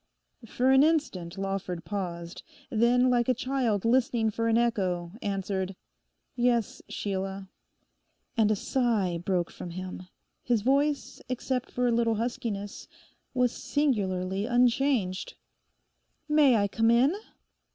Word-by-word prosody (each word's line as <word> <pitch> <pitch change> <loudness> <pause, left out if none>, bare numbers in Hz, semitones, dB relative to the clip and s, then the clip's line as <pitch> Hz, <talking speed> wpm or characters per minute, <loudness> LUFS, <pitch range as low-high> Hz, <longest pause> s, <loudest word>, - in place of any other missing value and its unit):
For 255 +4 +2
an 265 0 +6
instant 280 - 0
Lawford 195 -3 -3
paused, 170 -3 -5 0.3
then 245 +3 +3
like 240 0 +2
a 255 - +3
child 245 -5 -1
listening 235 -2 +2
for 230 +2 -1
an 225 0 +3
echo, 185 -7 0
answered, 195 -1 -2 0.6
'Yes, 240 -3 +1
Sheila.' 195 -1 -4 0.9
And 220 -3 +3
a 215 - +3
sigh 210 -7 0
broke 175 -1 -1
from 175 - -8
him; 185 +1 -7 0.3
his 235 -4 0
voice, 280 +3 +1
except 255 0 -2
for 250 - -1
a - - +2
little 230 -1 +2
huskiness, 230 -3 -4 0.5
was 250 -1 +3
singularly 200 -10 -1
unchanged. 240 -5 +1 0.9
'May 300 -4 +5
I 205 -2 +2
come 225 +3 +1
in? 245 +7 +4
225 Hz, 120 wpm, -28 LUFS, 190-250 Hz, 0.9 s, an